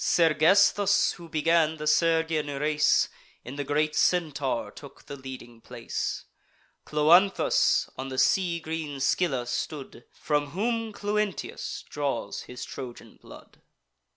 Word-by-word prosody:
Sergesthus, 190 +5 +4
who 170 -1 -12
began 160 0 +2
the 150 - -6
Sergian 160 0 +2
race, 150 0 +3 0.4
In 130 - -7
the 145 - -3
great 150 +2 0
Centaur 145 - 0
took 140 +4 -14
the 140 - -7
leading 130 -3 -10
place; - - -5 0.6
Cloanthus 170 +6 +3
on 135 +1 -4
the 130 - -6
sea 175 +3 +2
green 160 -3 -5
Scylla 135 -2 0
stood, 130 -1 -5
From 145 -1 -1
whom 225 +7 -2
Cluentius 205 -1 -3
draws 145 -2 -3
his 125 - -7
Trojan 125 -3 -9
blood. - - -15
155 Hz, 120 wpm, -27 LUFS, 140-170 Hz, 0.6 s, Sergesthus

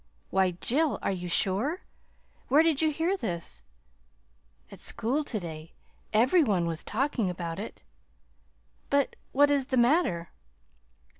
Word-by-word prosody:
"Why, 185 -2 +2
Jill, 280 -3 +2
are - - +1
you 180 -2 -4
sure? 205 - +1 0.6
Where 295 +5 +5
did 325 -3 +2
you 315 - +3
hear 325 +5 0
this?" 170 - -4 1.1
"At - - -11
school 245 +7 0
to 230 -6 -3
day. 160 -2 -8 0.4
Every 255 +11 +4
one 195 -9 +1
was 165 -2 -3
talking 235 -3 -1
about 170 -1 -5
it." 215 - -8 1.1
"But 280 -1 +1 0.2
what 290 +2 +4
is 275 -2 +1
the 260 - 0
matter?" 240 - +2
235 Hz, 135 wpm, -28 LUFS, 180-290 Hz, 1.1 s, Where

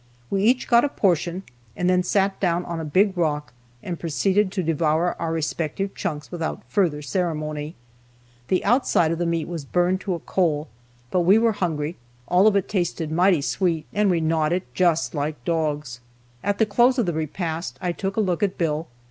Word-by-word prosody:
We 195 - +1
each 245 +5 +2
got 235 0 +5
a 290 - +1
portion, 180 - 0 0.3
and 180 - 0
then 180 0 +4
sat 195 +1 +1
down 175 -2 0
on 170 -1 -4
a - - -4
big 190 +6 +2
rock, 150 -5 -1 0.3
and 175 -2 -5
proceeded 190 +5 +1
to 190 -2 -2
devour 160 +1 +1
our 165 -1 -1
respective 165 +4 -2
chunks 150 -2 -4
without 165 -3 -4
further 150 0 0
ceremony. 155 -3 -2 0.7
The 185 - 0
outside 200 -8 +3
of 165 - -2
the 175 - 0
meat 165 -1 -1
was 170 -3 -5
burned 180 +6 +1
to 190 -3 -2
a - - -6
coal, 160 -3 0 0.4
but 185 - +2
we 185 +5 +5
were 230 0 +3
hungry, 165 -5 -2 0.3
all 185 +4 +5
of 215 - +4
it 200 - +1
tasted 175 -5 -2
mighty 175 -1 +3
sweet, 165 -1 0
and 210 -1 +2
we 170 -3 +2
gnawed 160 0 +1
it 185 +1 -3
just 170 -3 +2
like 145 -4 -3
dogs. 150 -6 -1 0.4
At 205 +1 0
the 220 - +3
close 240 +5 +3
of 240 - +2
the 175 - -1
repast, 160 +2 -3
I 180 -2 -1
took 195 +3 -4
a - - +4
look 185 -2 0
at 195 -2 0
Bill. 160 -1 -1
175 Hz, 195 wpm, -23 LUFS, 160-195 Hz, 0.7 s, got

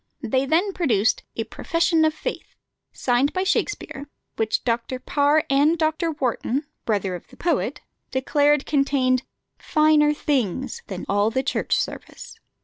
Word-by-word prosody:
They 260 +3 0
then 360 +7 +2
produced 225 - +1
a 225 - -1
"Profession 330 +7 +1
of 310 - +2
Faith," - - -6 0.4
signed 255 +3 +1
by 370 - 0
Shakspere, 290 -7 -2 0.3
which 220 -1 0
Dr. 235 +1 -1
Parr 290 +4 +2
and 290 +4 +3
Dr. 315 +1 0
Warton 265 +1 -1 0.2
(brother 200 -4 0
of 175 - -8
the - - -18
poet) 345 - -1 0.3
declared 290 +2 +2
contained 275 -3 +2 0.4
"finer 305 -1 +3
things" 265 - -1
than 190 -2 -6
all 205 +2 +2
the 260 +3 -1
Church 275 - 0
Service. - - -6
275 Hz, 140 wpm, -23 LUFS, 240-310 Hz, 0.4 s, and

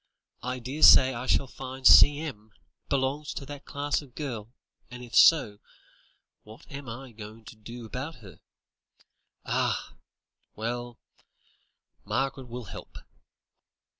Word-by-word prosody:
I 125 +1 -3
daresay 130 +1 +6
I 120 +2 -6
shall - - +2
find 130 0 -9
C.M. 145 -9 +6 0.4
belongs 140 +2 -1
to 140 - -6
that 145 0 -9
class 145 +1 -2
of 135 -4 -17
girl, 120 -7 -5 0.4
and 125 0 -9
if 120 - -13
so, 120 -11 +5 0.8
what 110 +2 -15
am 140 -2 -8
I 130 +3 -8
going 110 0 -11
to 110 - -11
do 115 +2 -10
about 130 +8 -6
her? 100 -4 -15 1.1
Ah! - - -1 0.6
well; 120 +2 -4 1.1
Margaret 135 -1 -2
will 125 +1 -7
help." 105 - -10
125 Hz, 120 wpm, -27 LUFS, 115-140 Hz, 1.1 s, daresay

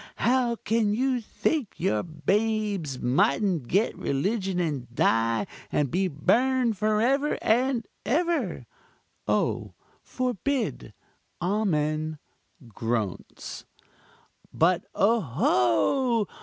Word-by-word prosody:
how 245 -1 +2
can 220 -2 0
you 255 +1 +1
think 250 +2 -1
your 105 0 +1
babes 195 - -1
mightn't 140 - +1
get 200 - +1
religion 190 +5 -1
and 145 -8 -2
die 115 -2 +2 0.3
and 145 -3 0
be 190 +2 +1
burned 240 - +2
for 210 +2 +1
ever 275 +6 +2
and 245 +1 +2 0.2
ever? 335 +5 0 0.6
(O! - - 0 0.3
forbid 255 +1 -2 0.4
amen 155 -5 0 0.6
groans.) 115 -3 -4 0.8
But, 175 +2 +2
oho! 205 - +2
200 Hz, 90 wpm, -26 LUFS, 150-235 Hz, 0.8 s, how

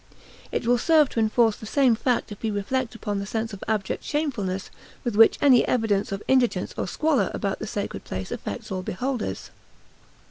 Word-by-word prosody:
It - - -2
will 245 +1 +3
serve 310 0 +4
to - - -2
enforce 220 0 +3
the 215 - -9
same 265 0 +4
fact 240 0 0
if 205 - -9
we 225 - -1
reflect 230 +4 -2
upon 205 -3 -3
the 200 - -5
sense 220 +1 -3
of 200 - -8
abject 210 -3 -1
shamefulness 210 -12 -2 0.3
with 240 -4 -2
which 225 +1 +6
any 265 -4 +6
evidence 210 -5 +1
of 195 +1 -4
indigence 245 -8 +2
or - - -2
squalor 305 - +1
about 195 -3 -2
the 220 - -5
sacred 205 -1 -4
place 95 0 -5
affects 100 - -6
all 185 -1 -2
beholders. 245 +7 -3
225 Hz, 185 wpm, -25 LUFS, 200-250 Hz, 0.3 s, which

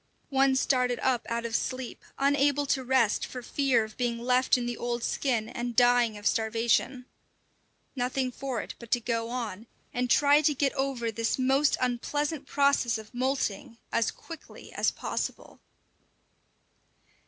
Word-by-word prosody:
One 270 0 +3
started 250 -2 +2
up 255 -2 +1
out 235 0 -2
of 230 0 -2
sleep, 255 -1 -3
unable 285 +1 +2
to 265 -1 0
rest 250 -4 +2
for 250 -1 -6
fear 260 -3 +2
of 215 0 -10
being 240 -2 -1
left 250 +2 +2
in 245 - -3
the 240 0 -2
old 240 0 -3
skin 240 -6 0
and 240 0 -4
dying 245 -2 +4
of 205 - -11
starvation. 230 +3 +1 0.9
Nothing 255 0 -1
for 255 -3 -4
it - - -8
but 235 - -11
to 245 - +2
go 230 0 -2
on, 230 -3 -5 0.3
and 250 0 -1
try 290 +2 +5
to 295 -1 +2
get 275 0 +1
over 265 -4 -1
this 230 +1 -1
most 270 +2 +3
unpleasant 285 +4 -2
process 280 -5 +2
of 220 -1 -11
moulting 245 -4 -2
as 230 -1 +2
quickly 330 -1 -11
as - - +2
possible. - - -5
250 Hz, 155 wpm, -28 LUFS, 235-270 Hz, 0.9 s, try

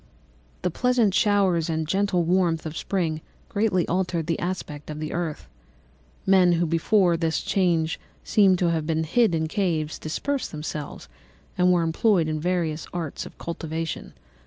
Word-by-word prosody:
"The 180 - +1
pleasant 245 -1 +2
showers 190 -5 +2
and 160 -1 -1
genial 190 0 +1
warmth 170 -2 +1
of 160 0 -5
spring 165 -4 -1 0.3
greatly 200 -4 +1
altered 180 -2 -1
the 165 0 -1
aspect 165 -5 -4
of 150 0 -5
the 155 0 -4
earth. 170 -3 -3 0.8
Men 185 -2 +5
who 170 +1 +2
before 170 +2 +3
this 165 -1 0
change 170 -4 +1 0.2
seemed 195 -3 +4
to 175 -1 +2
have 160 -2 -1
been 160 -1 +1
hid 180 +3 +2
in 160 0 0
caves 160 -5 -1
dispersed 275 - -3
themselves 150 -1 -6 0.5
and 180 0 +4
were 175 -2 +3
employed 165 +1 +2
in 155 0 -2
various 165 -2 -1
arts 165 -5 -4
of - - -16
cultivation. 165 -1 -5
170 Hz, 155 wpm, -25 LUFS, 160-185 Hz, 0.8 s, Men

